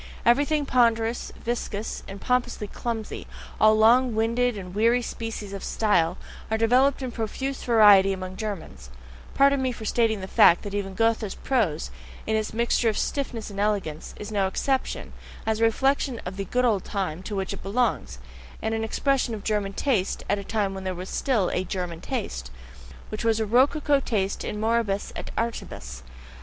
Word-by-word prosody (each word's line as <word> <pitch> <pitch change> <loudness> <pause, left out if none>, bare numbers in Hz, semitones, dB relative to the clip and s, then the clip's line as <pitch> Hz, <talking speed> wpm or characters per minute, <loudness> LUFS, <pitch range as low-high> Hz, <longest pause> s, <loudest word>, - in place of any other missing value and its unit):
Everything 285 +5 +3
ponderous, 230 -2 +2
viscous, 225 -3 -3
and 195 +1 -8
pompously 245 -2 0
clumsy, 225 +1 -5 0.3
all 215 0 +6
long 235 +2 +5
winded 230 +1 +1
and 180 -2 -8
wearying 230 +4 +3
species 225 -4 -5
of 195 - -6
style, 180 -5 +1 0.3
are 220 - +1
developed 255 +5 +3
in 255 - -3
profuse 265 +5 -3
variety 205 -5 +6
among 185 -1 -5
Germans 195 - -6 0.5
pardon 275 0 +4
me 260 -1 0
for 220 -2 -8
stating 220 -1 +1
the 190 - -6
fact 175 - +5
that 205 - -6
even 195 -2 -3
Goethe's 225 -1 +1
prose, 195 - 0 0.3
in 220 - 0
its 215 -1 -1
mixture 235 +1 +2
of 215 - -2
stiffness 240 -7 -2
and 200 - -7
elegance, 200 -7 -1
is 210 +1 -6
no 200 -2 +1
exception, 265 +7 -2 0.3
as 220 0 0
a 225 - +4
reflection 265 +1 +1
of 180 +1 -5
the 195 0 -4
"good 250 +6 +1
old 210 -6 +2
time" 185 -5 -3
to 205 +2 -5
which 195 0 -2
it 200 - -7
belongs, 195 - -1 0.4
and 220 0 -2
as 225 - 0
an - - -2
expression 250 +1 0
of 205 - -8
German 205 -2 -1
taste 210 -6 0
at 205 - +1
a - - -6
time 200 -1 -1
when 190 0 -6
there 185 -1 -3
was 180 +2 -7
still 225 -10 +1
a 180 - 0
"German 180 -2 -4
taste," 185 - -4 0.6
which 215 - -5
was 225 -1 +2
a 220 - +1
rococo 280 +5 +3
taste 200 -7 -1
in 210 - -4
moribus 220 -2 0
et - - -6
artibus. 65 - -4
220 Hz, 180 wpm, -25 LUFS, 195-240 Hz, 0.6 s, all